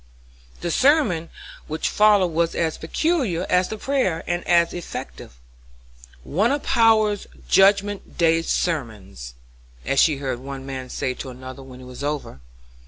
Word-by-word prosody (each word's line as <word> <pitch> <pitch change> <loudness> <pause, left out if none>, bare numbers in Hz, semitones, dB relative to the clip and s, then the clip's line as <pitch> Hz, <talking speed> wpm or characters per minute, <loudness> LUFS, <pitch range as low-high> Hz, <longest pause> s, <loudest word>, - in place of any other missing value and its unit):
The 170 - -2
sermon 255 - +2 0.4
which 155 +1 -2
followed 205 -3 +4
was 170 +1 0
as 160 -2 -1
peculiar 215 - 0
as 180 0 +3
the 220 - -5
prayer, 215 -10 -1
and 175 0 -2
as 170 -1 +3
effective. 175 - -7 0.9
"One 205 - +1
of 285 0 -1
Power's 215 -3 +3 0.2
judgment 200 +1 +2
day 165 -1 +3
sermons," 105 - -3 0.5
as 135 - +1
she 155 -4 +4
heard 130 -3 -3
one 135 0 -8
man 130 -1 -6
say 130 - -2
to 130 - -8
another, 130 +1 -10
when 130 -1 -12
it - - -11
was 125 +2 -9
over. 145 - -4
165 Hz, 145 wpm, -22 LUFS, 135-205 Hz, 0.9 s, followed